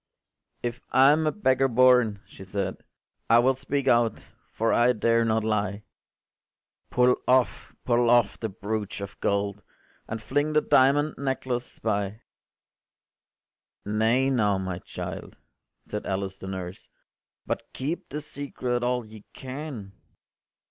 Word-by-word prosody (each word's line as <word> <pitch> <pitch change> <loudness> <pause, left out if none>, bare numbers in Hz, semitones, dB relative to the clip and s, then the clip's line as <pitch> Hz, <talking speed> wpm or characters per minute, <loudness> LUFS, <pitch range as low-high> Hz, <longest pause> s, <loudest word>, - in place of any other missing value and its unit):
” - - -49
“If 120 0 -3
I’m 145 +4 +5
a - - +3
beggar 135 -9 +2
born,” 125 -4 +4
she - - -13
said, 95 0 -3 0.5
“I 115 - +7
will 125 +3 +4
speak 140 +1 -3
out, 120 -2 +2 0.3
for 115 +1 0
I 120 +1 +4
dare 115 +1 +2
not 110 -1 +1
lie. 105 -1 -1 1.1
Pull 125 0 +3
off, 130 -1 +1
pull 120 -1 +3
off, 120 -3 +3
the 110 - -3
broach 105 +1 -4
of 100 0 -8
gold, 100 0 -1 0.5
And 110 - -4
fling 145 +7 -1
the 150 - +4
diamond 145 +3 +3
necklace 130 -3 -3
by.” 105 0 -2 1.6
“Nay 110 +6 +2
now, 105 -6 +2
my 95 -2 -4
child,” - - -7 0.5
said 105 - -5
Alice 95 0 -3
the 95 - -8
nurse, 95 -1 -7 0.6
“But - - -4
keep 150 +6 -4
the 150 +3 -4
secret 130 -4 -3
all 125 -1 0
ye 110 -1 -13
can. 130 -6 -7
120 Hz, 135 wpm, -26 LUFS, 105-130 Hz, 1.6 s, I